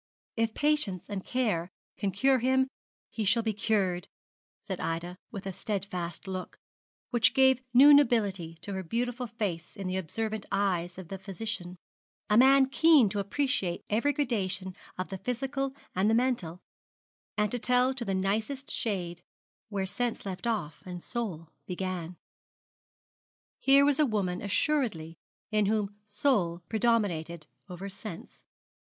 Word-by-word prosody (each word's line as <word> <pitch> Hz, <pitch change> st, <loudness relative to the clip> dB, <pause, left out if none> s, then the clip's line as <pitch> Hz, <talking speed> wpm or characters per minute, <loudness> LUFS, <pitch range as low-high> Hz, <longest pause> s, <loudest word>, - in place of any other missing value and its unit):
'If 225 Hz, -1 st, 0 dB
patience 290 Hz, -, +1 dB
and 195 Hz, -2 st, -3 dB
care 210 Hz, -10 st, 0 dB, 0.3 s
can 200 Hz, -, -1 dB
cure 260 Hz, +7 st, +3 dB
him, 260 Hz, +2 st, +3 dB, 0.4 s
he 225 Hz, -, -2 dB
shall 225 Hz, +3 st, +3 dB
be 220 Hz, -1 st, 0 dB
cured,' 195 Hz, -4 st, 0 dB, 0.5 s
said 190 Hz, -4 st, -5 dB
Ida, 170 Hz, +2 st, -3 dB
with 200 Hz, -3 st, -7 dB
a 195 Hz, -, -3 dB
steadfast 185 Hz, -4 st, -4 dB
look, 185 Hz, -1 st, -5 dB, 0.5 s
which 240 Hz, -2 st, +4 dB
gave 265 Hz, -1 st, +5 dB
new 275 Hz, +4 st, +9 dB
nobility 205 Hz, -, +3 dB
to 200 Hz, -, -4 dB
her 190 Hz, -, -2 dB
beautiful 245 Hz, +6 st, -2 dB
face 200 Hz, -7 st, -4 dB
in 195 Hz, -, -5 dB
the 185 Hz, +1 st, -1 dB
observant 215 Hz, +4 st, -3 dB
eyes 180 Hz, -3 st, 0 dB
of 185 Hz, -3 st, -9 dB
the 195 Hz, -, -5 dB
physician 195 Hz, -2 st, -4 dB, 0.6 s
a -, -, +5 dB
man 265 Hz, +3 st, +7 dB
keen 285 Hz, -3 st, +5 dB
to 205 Hz, -, -2 dB
appreciate 200 Hz, -4 st, -1 dB
every 235 Hz, +7 st, +3 dB
gradation 200 Hz, -9 st, -1 dB, 0.2 s
of 185 Hz, -, -3 dB
the 190 Hz, -1 st, -5 dB
physical 270 Hz, +3 st, -2 dB, 0.2 s
and 190 Hz, +3 st, +2 dB
the 225 Hz, -, +4 dB
mental, 230 Hz, -9 st, 0 dB, 0.8 s
and 210 Hz, -1 st, +1 dB
to 245 Hz, -, -1 dB
tell 250 Hz, +2 st, +3 dB
to 255 Hz, -2 st, -4 dB
the 195 Hz, -4 st, -1 dB
nicest 215 Hz, +8 st, -1 dB
shade 180 Hz, -5 st, -2 dB, 0.5 s
where 200 Hz, -2 st, -1 dB
sense 240 Hz, +4 st, -3 dB
left 195 Hz, +4 st, -4 dB
off 190 Hz, -10 st, -2 dB
and 180 Hz, -1 st, -7 dB
soul 175 Hz, -9 st, -4 dB, 0.2 s
began. 180 Hz, -2 st, -4 dB, 1.4 s
Here 275 Hz, +1 st, +6 dB
was 290 Hz, +1 st, +3 dB
a 300 Hz, -, +5 dB
woman 195 Hz, -6 st, -1 dB
assuredly 205 Hz, -, 0 dB, 0.4 s
in 210 Hz, -2 st, +2 dB
whom 210 Hz, -1 st, 0 dB
soul 205 Hz, -6 st, +1 dB
predominated 195 Hz, -8 st, 0 dB, 0.2 s
over 180 Hz, +2 st, -6 dB
sense. 195 Hz, -2 st, -9 dB
205 Hz, 145 wpm, -29 LUFS, 185-245 Hz, 1.4 s, new